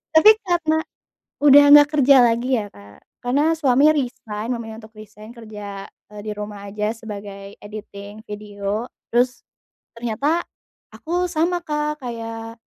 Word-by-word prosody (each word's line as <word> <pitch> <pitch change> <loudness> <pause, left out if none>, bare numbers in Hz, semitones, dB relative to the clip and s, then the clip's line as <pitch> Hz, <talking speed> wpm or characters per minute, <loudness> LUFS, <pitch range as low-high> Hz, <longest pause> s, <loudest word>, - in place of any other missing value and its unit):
tapi 420 +7 +9 0.2
karena 320 -3 +1 0.6
udah 290 0 +8
nggak 295 0 +8
kerja 275 0 +6
lagi 240 +2 +2
ya, - - -6
Kak, 100 0 -16 0.2
karena 290 +6 +2
suami 275 -1 +3
resign, 235 -5 -4
memilih 225 -2 -7
untuk 220 - -19
resign 215 +1 -13
kerja, 210 -4 -9 0.3
eee, 205 - -8
di 215 0 -5
rumah 205 -1 -7
aja 210 +2 -2
sebagai 200 -3 -9
editing 205 0 -10
video 205 +1 -4 0.3
terus 245 +1 +1 0.6
ternyata 275 +9 -1 0.5
aku 355 +2 -2
sama, 345 +2 0
Kak, 300 -2 -3
kayak, 230 -1 -6
230 Hz, 130 wpm, -21 LUFS, 210-290 Hz, 0.6 s, tapi